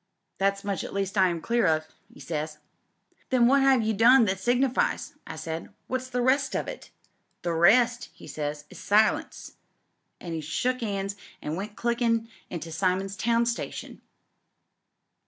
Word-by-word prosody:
That 195 +1 +1
much 200 -1 -2
at - - -7
least 195 0 -2
I 190 -2 +5
am 170 -2 -2
clear 235 0 +2
of,' 155 -1 +2 0.3
'e - - -16
says. 155 -1 -4 0.7
"'Then 255 -3 +4
what 275 +3 +5
have 265 -3 +4
you 220 0 +1
done 235 +4 +6
that 190 -1 -1
signifies?' 245 +4 +1
I - - -6
said. 160 +3 -5
'What's 255 0 -3
the 250 -1 -1
rest 270 +2 +2
of - - -1
it?' - - -8 0.5
"'The 170 - 0
rest,' 235 +8 +4
'e - - -12
says, 145 -1 -4
'is 185 - -11
silence,' 210 +3 +1 0.6
an' 170 -2 -6
he 160 - -3
shook 250 - -1
'ands 200 -2 -2 0.2
and 150 - -4
went 205 +3 -6
clickin' 235 -1 0 0.2
into 165 -1 -6
Simons 185 +3 0
Town 235 +3 +2
station." 235 0 -4
205 Hz, 160 wpm, -27 LUFS, 175-240 Hz, 0.7 s, done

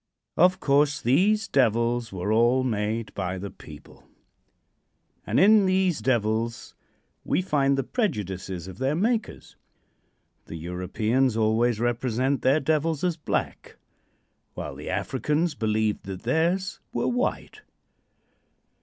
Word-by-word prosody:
Of 185 +2 +4
course 145 -1 +2
these 210 - +2
devils 120 - +1
were 95 +2 -3
all 120 +3 +3
made 110 -1 -2
by 95 -1 -3
the 100 +2 -6
people, - - -15 1.2
and - - +2
in 205 0 +6
these 185 -4 +1
devils 115 -1 -1 0.5
we 185 - 0
find 140 -5 +1
the 135 - 0
prejudices 95 - -3
of 95 0 -10
their 135 +3 0
makers. 220 +6 -2 0.9
The - - -7
Europeans 105 +9 -1
always 110 +1 +2
represent 120 +3 0
their 135 +4 +3
devils 155 +1 0
as 180 -2 +1
black, 155 - -4 0.8
while - - -5
the - - -8
Africans 155 +2 -1
believed 110 -4 -1
that 95 -1 -7
theirs 180 +4 0
were - - -1
white. 245 0 -2
130 Hz, 120 wpm, -25 LUFS, 110-160 Hz, 1.2 s, in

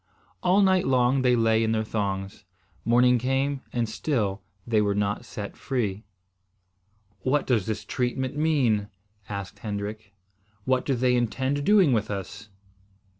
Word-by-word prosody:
All 185 +3 +4
night 190 -1 +3
long 130 0 +3
they 125 -1 +4
lay 115 -1 +3
in 110 0 +1
their 110 0 0
thongs. 100 -2 -3 0.4
Morning 125 +1 +4
came 135 +2 0
and 120 -1 -1
still 110 -4 -1 0.2
they 110 -2 +2
were 100 -1 +1
not 105 0 -1
set 100 -1 -7
free. 110 -6 -3 1.1
"What 130 +8 +1
does 115 -6 +1
this 110 - -3
treatment 130 +2 -2
mean?" 135 -10 +2 0.4
asked 100 0 -6
Hendrik. 105 0 -6 0.5
"What 130 -1 +1
do 135 - +2
they 125 0 +2
intend 130 +4 0
doing 190 -5 +5
with 110 -3 0
us?" 105 +1 -6
120 Hz, 140 wpm, -26 LUFS, 105-130 Hz, 1.1 s, doing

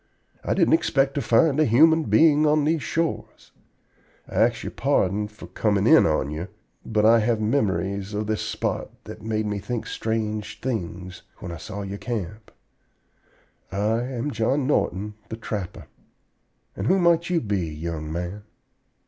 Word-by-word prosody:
I - - 0
didn't - - +3
expect 135 - +2
to 140 - -1
find 135 +6 +3
a 155 - +5
human 160 +7 +5
being 155 -1 +4
on 150 0 +3
these 155 +1 +1
shores. 165 +2 -3 0.8
I - - -12
ax - - +2
your - - -5
pardon 100 +3 +1
for 105 +1 -12
comin' 100 -2 0
in 160 +6 +6
on 75 -2 0
ye, 80 +4 -4 0.4
but 105 -1 +1
I 115 +1 +6
have 115 0 +1
memories 100 -3 -1
of 105 +1 -1
this 110 0 -1
spot - - -3
that - - -10
made 110 -1 -2
me 105 -1 -2
think 120 +3 -4
strange 110 -1 -3
things 90 -6 -4 0.2
when 85 - -7
I 85 - -6
saw 95 +5 -6
your 100 +1 -6
camp. 110 -2 -5 1.2
I 105 +4 0
am 125 +2 -3
John 130 +3 0
Norton, 105 -7 0 0.2
the 110 - -5
trapper. 105 -5 -5 0.9
And 95 - -3
who 190 - +4
might 170 -1 +3
you 175 -2 +2
be, 100 - -2
young 80 0 -5
man?" 90 +5 -4
110 Hz, 160 wpm, -24 LUFS, 100-135 Hz, 1.2 s, in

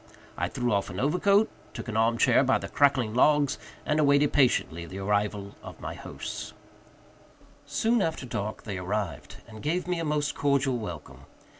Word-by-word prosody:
I - - -1
threw 120 -2 -1
off 100 -1 0
an 90 - -6
overcoat, 200 - +3 0.3
took - - -6
an 110 - -4
arm 115 +1 +3
chair 125 +2 +4
by 130 0 +3
the - - -6
crackling 135 -6 +2
logs, 145 +3 +3 0.3
and 150 +1 +1
awaited 140 0 +4
patiently 85 - +2
the 95 - -8
arrival 100 0 -1
of - - -10
my - - -5
hosts. - - -7 1.1
Soon 220 +12 +1
after 160 -6 -2
dark 105 -3 -4
they 100 -5 -4
arrived, 100 +3 -3
and 110 -2 -11
gave 175 +4 -1
me 180 -1 -1
a - - -2
most 150 -1 0
cordial 140 -3 +1
welcome. 110 - -8
130 Hz, 170 wpm, -27 LUFS, 105-150 Hz, 1.1 s, chair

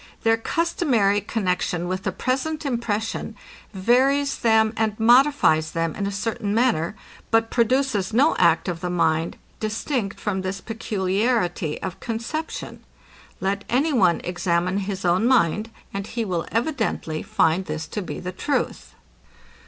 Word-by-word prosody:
Their 225 0 +4
customary 230 - +1
connexion 180 -5 -1
with 185 +1 -2
the - - -2
present 300 +4 -2
impression, 225 -3 -2 0.4
varies 265 +8 +2
them 220 -2 +3
and 220 -1 -1
modifies 225 - +4
them 165 -1 -1
in 200 - -2
a - - -2
certain 210 0 -2
manner, 220 -7 +1 0.3
but 225 0 +2
produces 235 -4 +1
no 270 +8 +4
act 170 0 +3
of 175 -2 -2
the 180 0 -3
mind, 165 -2 +1 0.2
distinct 215 0 -2
from 195 -3 -2
this 190 +1 -3
peculiarity 195 -5 -1
of 190 0 -5
conception. 235 +9 -5 0.6
Let 200 +1 -1
any 285 +6 +2
one 185 -9 +3
examine 180 +1 0
his 190 -1 -4
own 180 +6 +3
mind, 220 -3 +2 0.2
and 195 0 -4
he 230 -1 -3
will 175 -4 -2
evidently 225 - -1
find 165 +4 +1
this 155 0 -4
to 210 - -3
be 185 - -6
the 180 - -5
truth. 275 +9 -2
210 Hz, 140 wpm, -23 LUFS, 180-240 Hz, 0.6 s, Their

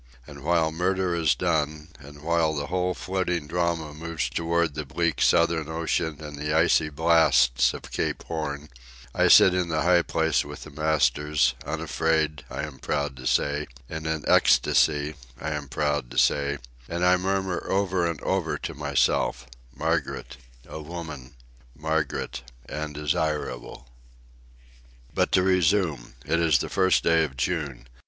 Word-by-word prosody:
And 70 -1 -12
while 80 -1 +2
murder 90 +2 0
is 80 -6 +2
done, 75 0 -1
and 70 +1 -13
while 80 -1 +1
the 70 -1 -2
whole 90 +1 -1
floating 90 -4 -2
drama 85 -1 -1
moves 80 0 -3
toward 85 -1 0
the 75 +1 -4
bleak 80 +1 -1
southern 80 -2 +3
ocean 80 -2 -2
and 75 -1 -8
the 75 +1 -1
icy 80 -1 +3
blasts 75 -5 +4
of - - -8
Cape - - -2
Horn, 75 -2 -4 0.4
I - - +3
sit 95 - +8
in 90 -1 0
the 75 -1 0
high 90 0 +5
place 80 -2 +1
with - - -9
the - - -11
masters, 75 -1 +1
unafraid, 80 -3 -1
I - - -4
am 75 -3 -7
proud 70 -2 -2
to 65 0 -5
say, 75 +1 +1 0.2
in 80 +1 -5
an 80 -2 -2
ecstasy, 75 0 +3 0.3
I 75 - -3
am 75 -2 -4
proud 75 0 -1
to - - -9
say, 70 0 +2 0.3
and 85 +1 -1
I 90 0 +6
murmur 95 0 -1
over 95 -3 +1
and 85 - -4
over - - -1
to - - -6
myself—Margaret, 65 -4 -2 0.3
a 80 - -7
woman; 75 -5 -8 0.4
Margaret, 80 -4 -2 0.3
and 75 -1 -5
desirable. 75 -4 -3 1.3
But - - +1
to 90 - +4
resume. 90 -8 +1
It 85 - +1
is 80 -4 +4
the - - -3
first 95 -2 +2
day 85 -1 +4
of 65 -4 -5
June. 70 -3 -2
80 Hz, 150 wpm, -25 LUFS, 75-85 Hz, 1.3 s, sit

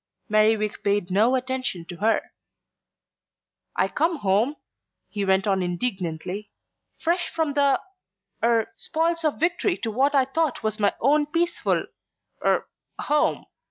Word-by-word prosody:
Merriwig 215 0 +2
paid 200 -2 0
no 220 +7 +4
attention 255 -9 -2
to 175 0 -9
her. 220 +4 +1 1.4
"I - - +2
come 330 +3 0
home," 220 +3 +1 0.5
he 205 -2 -3
went 190 0 +2
on 195 -2 +1
indignantly, 180 0 -3 0.5
"fresh 345 +2 0
from 320 -3 -1
the 280 -2 +3 0.6
er 230 -1 +2
spoils 330 +1 -1
of 305 -2 0
victory 350 +3 +1
to 225 - -3
what 275 +6 +2
I 270 -2 +5
thought 300 +1 -1
was 215 0 -1
my 205 -1 +2
own 290 +3 +3
peaceful 340 +3 0 0.6
er - - +2 0.3
home. 295 0 +1
240 Hz, 130 wpm, -25 LUFS, 205-300 Hz, 1.4 s, I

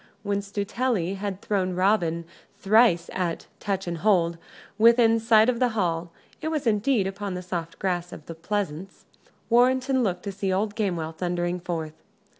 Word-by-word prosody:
When 200 -1 0
Stuteley 200 -1 -2
had 200 -1 -5
thrown 185 -3 -1
Robin 175 -3 +1 0.3
thrice 200 -5 +4
at 175 -3 -2
"touch 200 -2 -2
and 170 -1 -4
hold," 170 -4 +2 0.4
within 230 0 +5
sight 225 -1 +5
of 245 -2 +1
the 250 - +3
hall 170 -3 -1 0.3
it - - -3
was 310 -4 -2
indeed 225 0 +2
upon 195 0 -4
the 180 - -5
soft 170 -2 -5
grass 175 -2 -2
of 150 - -10
the 165 - -7
pleasance 185 0 -4 0.5
Warrenton 260 +2 +3
looked 180 -6 -1
to 200 - -4
see 195 0 -2
old 205 +3 0
Gamewell 175 -7 -1
thundering 175 +1 -2
forth. 165 -3 -4
195 Hz, 160 wpm, -25 LUFS, 175-220 Hz, 0.5 s, within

